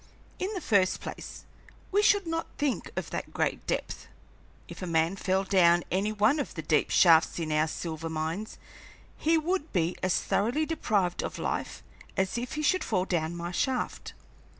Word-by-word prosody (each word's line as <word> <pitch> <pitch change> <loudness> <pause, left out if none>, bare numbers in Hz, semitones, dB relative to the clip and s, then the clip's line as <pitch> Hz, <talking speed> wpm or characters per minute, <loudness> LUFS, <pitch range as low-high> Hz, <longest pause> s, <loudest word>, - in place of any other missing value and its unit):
In 380 +3 -2
the 370 - -3
first 195 -4 +2
place, - - -8 0.5
we 405 +2 +4
should 405 -2 +4
not 330 0 -2
think 285 -3 -1
of - - -4
that - - -4
great - - -1
depth. - - -3 0.6
If - - -10
a 185 - -4
man 165 +2 +1
fell 190 0 0
down 175 -3 +4
any 195 +4 +1
one 215 +8 +3
of 285 - -4
the 160 - -5
deep 150 0 +2
shafts 165 -2 +5
in 160 -2 -2
our 155 +1 +2
silver 165 0 -4
mines, 160 +7 -3 0.6
he 325 +1 +2
would 330 0 -1
be 175 -2 0
as 185 - +2
thoroughly 245 +10 0
deprived 205 - 0
of - - -5
life - - -3 0.3
as 190 +1 0
if 245 +1 -5
he 305 - -2
should 370 +5 +2
fall 185 -4 0
down 170 -2 -1
my 170 0 -4
shaft. 255 +7 -2
190 Hz, 175 wpm, -28 LUFS, -, 0.6 s, shafts